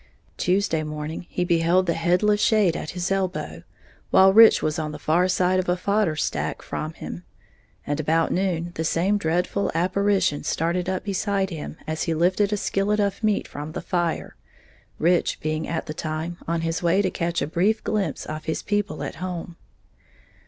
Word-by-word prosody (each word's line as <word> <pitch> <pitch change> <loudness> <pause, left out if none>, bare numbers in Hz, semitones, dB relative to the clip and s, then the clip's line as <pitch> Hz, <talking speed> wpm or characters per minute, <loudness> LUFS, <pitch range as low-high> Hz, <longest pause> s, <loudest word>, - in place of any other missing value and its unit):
Tuesday 180 -3 +1
morning 150 +2 -5
he 180 - -1
beheld 170 +1 +3
the 170 - +1
headless 180 +6 +2
shade 210 -8 +3
at - - -5
his 180 +1 -3
elbow, 190 -1 -2 0.5
while 190 0 +6
Rich 225 +2 +7
was 155 +1 0
on 155 -1 -3
the - - -6
far 165 +5 +2
side 185 0 +2
of 185 - -2
a 180 - +2
fodder 200 -3 +1
stack 150 - -2
from 155 +1 -4
him; 85 - -8 0.6
and 145 +1 -2
about 160 +2 +1
noon, 175 -2 -1
the 160 - -3
same 185 +6 +1
dreadful 180 +4 0
apparition 190 -2 +1
started 175 +3 -1
up 190 -1 -2
beside 195 -1 -1
him 155 -1 -6
as 155 0 -3
he 165 - 0
lifted 185 +5 +2
a 210 - +1
skillet 205 +2 0
of 200 +1 -1
meat 215 -2 +1
from 150 +2 -7
the - - -3
fire, 175 -3 -2 0.6
Rich 175 +2 +2
being 155 0 -2
at 165 -1 -3
the 155 - -5
time 160 +2 -4
on 165 0 0
his 165 0 -2
way 180 +3 +3
to 185 - 0
catch 170 0 -1
a - - 0
brief 190 +8 +1
glimpse 195 -9 -2
of 155 0 -6
his 160 - -2
people 205 -7 -1
at - - -5
home. 175 -2 -5
175 Hz, 180 wpm, -24 LUFS, 160-195 Hz, 0.6 s, Rich